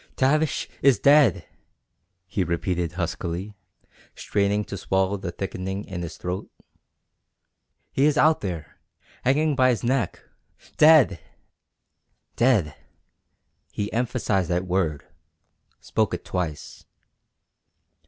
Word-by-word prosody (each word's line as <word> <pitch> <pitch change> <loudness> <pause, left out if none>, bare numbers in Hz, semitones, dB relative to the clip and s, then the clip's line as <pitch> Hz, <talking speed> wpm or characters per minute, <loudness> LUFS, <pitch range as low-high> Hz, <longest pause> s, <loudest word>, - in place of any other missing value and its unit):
"Tavish 150 +3 +1
is 135 -4 +5
dead!" 140 - +4 0.8
he 95 +1 -1
repeated 85 0 -2
huskily, 90 +3 -4 0.6
straining 105 +1 0
to - - -6
swallow 95 0 0
the 95 -3 -5
thickening 95 +2 -5
in 90 -3 -6
his 85 -1 -6
throat. 90 +2 -5 1.4
"He 135 - +2
is 150 - +1
out 155 +1 +4
there 85 -7 -6 0.4
hanging 145 +3 +2
by 130 -1 +4
his 120 -2 0
neck 125 +1 -1 0.5
dead!" 150 - +6 1.2
Dead! 110 - +2 1.0
He 105 0 -4
emphasized 115 -6 0
that 90 +1 0
word 85 -6 -1 0.7
spoke - - -1
it - - -10
twice. 85 -5 -5
100 Hz, 105 wpm, -24 LUFS, 90-130 Hz, 1.4 s, dead